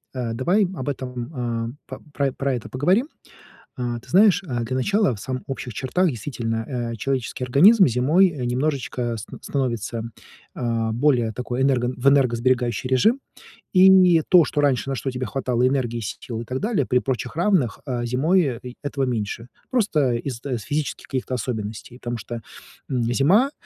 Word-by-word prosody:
Э, 120 -3 -2
давай 175 - +2
об 130 -3 -4
этом, 125 -3 -4
э, - - -7 0.2
по 140 -2 0
про 135 -1 -1
это 120 - -6
поговорим. 185 - +1 0.7
Э, 120 -2 -3
ты - - -20
знаешь, 195 -1 +5
э, 125 -8 -3
для 130 +3 -3
начала 200 - +2
в 105 - -6
самых 130 +3 -4
общих 130 -4 -5
чертах 180 +8 +1
действительно, 120 -1 -3
э, - - -4
человеческий 130 +2 -3
организм 185 - +6
зимой, 145 +11 +4
э, 150 -8 -5
немножечко 125 -2 -1
ст 105 - -8 0.2
становится, 120 -4 -2 0.5
э, 115 -2 -1
более 120 -2 +2
такой 125 +2 -3
энерго 125 -2 +2
в 125 +3 +2
энергосберегающий 125 -3 +2
режим. 215 - +3 0.6
И 185 -3 +6
то, 180 -3 +7
что 145 - -1
раньше, 135 -2 +1
на 135 - -1
что 135 +1 -3
тебе 125 -1 -4
хватало 125 +1 0
энергии, 125 -3 -1
сил 115 +2 -5
и - - -7
так 125 +3 -3
далее, 205 - 0
при 125 - +2
прочих 125 0 -3
равных, 170 - +1
а 125 -4 -2
зимой 135 +3 +1
и 125 0 -9
этого 140 -1 -2
меньше. 120 -1 -3 0.2
Просто 155 - +1
из 120 0 -4
с 125 -6 -3
физических 145 +9 -3
каких-то 130 -1 -3
особенностей, 115 0 -5
потому 120 0 -4
что, 115 +2 -7 0.5
м, 125 -3 0
зима- 195 - +4
130 Hz, 165 wpm, -23 LUFS, 120-145 Hz, 0.7 s, то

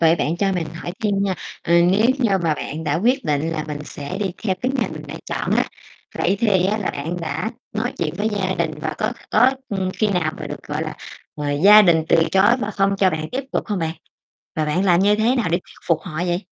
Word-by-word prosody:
Vậy 165 0 +5
bạn 160 +2 -1
cho 195 +1 +1
mình 175 -3 -1
hỏi 170 +1 -6
thêm 210 -2 +1
nha, 195 -2 0 0.3
ờ, 170 - 0
nếu 190 +6 +4
như 240 -5 +2
mà 165 -3 +1
bạn 155 +2 -5
đã 145 -2 0
quyết 245 - +1
định 150 +2 0
là 155 -2 -3
mình 150 -1 -5
sẽ 145 +7 -6
đi 200 -2 -1
theo 195 -4 +1
cái 255 +1 +1
ngành 240 - 0
mình - - -7
đã - - -7
chọn - - -3
á, - - +3 0.5
vậy 200 - +2
thì 195 -5 +3
á, 210 +3 0
là 205 - -1
bạn 160 +5 -4
đã 160 +6 -3 0.2
nói - - -2
chuyện 160 -2 -1
với 210 +2 +1
gia 190 -3 -1
đình 170 -3 0
và 155 0 -3
có 215 +3 0 0.2
có, 245 +4 +5 0.2
ừm, 190 -2 -1
khi 215 - +3
nào 180 -6 0
mà - - -4
được, - - -7
gọi - - -3
là, - - -5 0.4
ờ, 145 -1 -2
gia 210 +1 +10
đình 165 -4 +4
từ 165 - +5
chối 195 +5 +5
mà 205 - -2
không 195 -1 +1
cho 195 -1 +3
bạn 155 -1 -3
tiếp 265 +2 -2
tục - - -1
hông 205 -3 -1
bạn? 160 -1 -2 0.6
Và 155 - 0
bạn 150 +5 0
làm 175 -2 +4
như 205 +2 +4
thế 225 +4 +2
nào 235 -7 0
để 170 - +2
thuyết 180 - -16
phục 165 -2 +3
họ 175 -5 -8
vậy? 175 -1 +1
185 Hz, 260 wpm, -21 LUFS, 160-205 Hz, 0.6 s, gia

